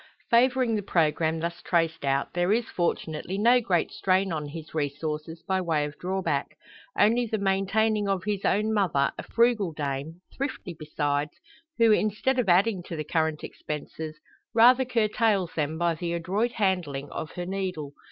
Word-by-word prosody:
Favouring 250 0 +4
the 210 - 0
programme 160 -3 +1
thus 170 +1 -4
traced 165 -3 0
out, 135 0 0
there 175 +2 +1
is, 230 +2 +2
fortunately, 170 +1 -2
no 240 +4 +5
great 185 -7 0
strain 190 0 +1
on 150 -2 -3
his 155 +1 -9
resources 155 +2 -3
by 190 0 0
way 160 -4 0
of 145 0 -7
drawback; 190 +1 -2 0.4
only 235 +3 +3
the 220 - -1
maintaining 200 +2 +1
of 190 -3 0
his 205 -1 -2
own 215 +3 +1
mother, 175 -10 +2
a - - -1
frugal 230 -6 +2
dame 145 +3 -4
thrifty 260 -9 -4
besides 150 -2 -2 0.4
who, 230 -2 +5
instead 215 +5 +1
of 225 -6 +1
adding 190 +2 +3
to 170 - -7
the 155 - -3
current 160 0 -1
expenses, 155 +1 -6 0.4
rather 250 +3 +6
curtails 215 -5 +1
them 155 0 -2
by 170 0 +1
the 170 +1 -3
adroit 195 +8 -1
handling 175 -9 -1
of 155 - -5
her 175 - -4
needle. 180 -6 -4
180 Hz, 160 wpm, -27 LUFS, 160-215 Hz, 0.4 s, rather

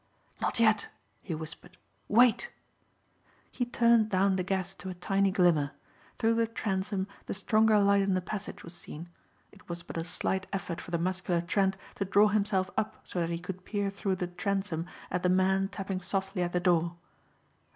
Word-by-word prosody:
"Not - - 0
yet," 220 -2 +4 0.3
he 170 - -4
whispered. 160 +1 -9 0.3
"Wait." 245 - +5 1.0
He 245 - -1
turned 235 -2 +4
down 195 0 +3
the 185 - 0
gas 190 0 -1
to 190 0 -8
a 185 - -5
tiny 195 +2 +1
glimmer. 175 -6 +3 0.4
Through 225 -1 +3
the 230 0 +2
transom 195 -3 -2 0.2
the - - -2
stronger 215 +2 +4
light 200 0 +4
in 195 -1 +2
the - - +2
passage 200 +2 -6
was 170 - -9
seen. 170 -1 -9 0.4
It - - -19
was 170 0 -4
but - - -7
a 165 - -1
slight 185 +2 -2
effort 185 -3 -3
for - - -10
the 170 - 0
muscular 180 0 0
Trent 190 +2 +1 0.2
to 200 - 0
draw 205 +2 +5
himself 200 -3 +1
up 220 +1 -2
so 180 - -4
that 170 -1 0
he 170 - -1
could 180 +1 -7
peer 200 -1 -1
through 195 -1 -1
the 180 - -2
transom 180 -1 -2 0.2
at - - 0
the 180 - +2
man 190 +1 +3
tapping 195 -2 -4
softly 195 0 -2
at 175 0 -1
the 180 - +2
door. 170 -1 +2
190 Hz, 185 wpm, -30 LUFS, 180-205 Hz, 1.0 s, Wait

